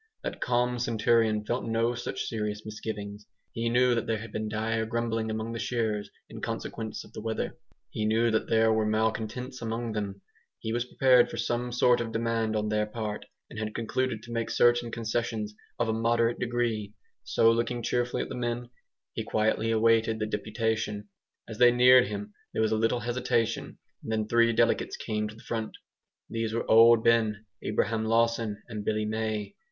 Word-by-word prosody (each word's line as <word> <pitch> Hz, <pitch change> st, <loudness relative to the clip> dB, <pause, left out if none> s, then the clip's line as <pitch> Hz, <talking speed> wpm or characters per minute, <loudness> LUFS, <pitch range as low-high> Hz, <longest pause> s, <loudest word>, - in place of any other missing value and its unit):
That -, -, -5 dB
calm 125 Hz, 0 st, +1 dB
centurion 115 Hz, -2 st, +2 dB
felt 120 Hz, +3 st, -1 dB
no 115 Hz, +1 st, +1 dB
such 120 Hz, -, -4 dB
serious 105 Hz, -1 st, -3 dB
misgivings. 105 Hz, -1 st, -6 dB, 0.2 s
He 115 Hz, 0 st, -1 dB
knew 125 Hz, +1 st, +4 dB
that 115 Hz, -, -1 dB
there 115 Hz, -, +1 dB
had 110 Hz, 0 st, -8 dB
been 110 Hz, 0 st, -3 dB
dire 110 Hz, +1 st, -1 dB
grumbling 115 Hz, 0 st, -1 dB
among 110 Hz, +1 st, -3 dB
the 115 Hz, -, -4 dB
shearers 110 Hz, -4 st, -1 dB, 0.2 s
in -, -, -10 dB
consequence 110 Hz, -1 st, -4 dB
of -, -, -17 dB
the -, -, -6 dB
weather. 110 Hz, 0 st, -3 dB, 0.4 s
He 110 Hz, -, -2 dB
knew 115 Hz, +2 st, +2 dB
that 110 Hz, -, 0 dB
there 110 Hz, 0 st, +4 dB
were 110 Hz, -1 st, +1 dB
malcontents 110 Hz, +4 st, -1 dB
among 115 Hz, 0 st, -3 dB
them. 100 Hz, -2 st, -4 dB, 0.3 s
He 110 Hz, -, -4 dB
was 120 Hz, +1 st, 0 dB
prepared 125 Hz, -1 st, +4 dB
for -, -, -6 dB
some 120 Hz, +1 st, -1 dB
sort 125 Hz, 0 st, +3 dB
of 115 Hz, -1 st, -4 dB
demand 115 Hz, -1 st, 0 dB
on 105 Hz, 0 st, 0 dB
their 105 Hz, 0 st, +1 dB
part, 105 Hz, -1 st, -5 dB, 0.2 s
and -, -, -8 dB
had 110 Hz, -1 st, -4 dB
concluded 120 Hz, 0 st, -1 dB
to 120 Hz, -, -10 dB
make 115 Hz, -1 st, -2 dB
certain 120 Hz, 0 st, +3 dB
concessions 110 Hz, -2 st, -2 dB, 0.2 s
of 120 Hz, -, 0 dB
a 110 Hz, -, +1 dB
moderate 115 Hz, +1 st, +1 dB
degree. 115 Hz, -4 st, -1 dB, 0.3 s
So 115 Hz, -, +4 dB
looking 115 Hz, +1 st, -1 dB
cheerfully 120 Hz, +1 st, 0 dB
at -, -, -8 dB
the -, -, -5 dB
men, 120 Hz, 0 st, -3 dB, 0.4 s
he -, -, -3 dB
quietly 110 Hz, +1 st, +1 dB
awaited 115 Hz, 0 st, +3 dB
the 110 Hz, -, -1 dB
deputation. 110 Hz, -1 st, -2 dB, 0.4 s
As 110 Hz, -2 st, -8 dB
they 120 Hz, 0 st, +8 dB
neared 125 Hz, 0 st, +7 dB
him 105 Hz, 0 st, -6 dB, 0.2 s
there -, -, 0 dB
was 110 Hz, -, +1 dB
a -, -, +3 dB
little 115 Hz, +2 st, +1 dB
hesitation, 120 Hz, -1 st, -1 dB, 0.2 s
and -, -, -6 dB
then 110 Hz, -1 st, 0 dB
three 115 Hz, +1 st, +4 dB
delegates 115 Hz, -, +1 dB
came 105 Hz, 0 st, -2 dB
to 105 Hz, -, -10 dB
the 115 Hz, -, -15 dB
front. 110 Hz, -2 st, -4 dB, 0.5 s
These 115 Hz, -1 st, -2 dB
were 115 Hz, -, -1 dB
Old 115 Hz, 0 st, +7 dB
Ben, 110 Hz, -2 st, +2 dB, 0.2 s
Abraham 110 Hz, +1 st, 0 dB
Lawson, 115 Hz, -2 st, +1 dB
and 105 Hz, -3 st, -5 dB
Billy 110 Hz, 0 st, 0 dB
May. 110 Hz, -, -2 dB
115 Hz, 185 wpm, -28 LUFS, 110-120 Hz, 0.5 s, they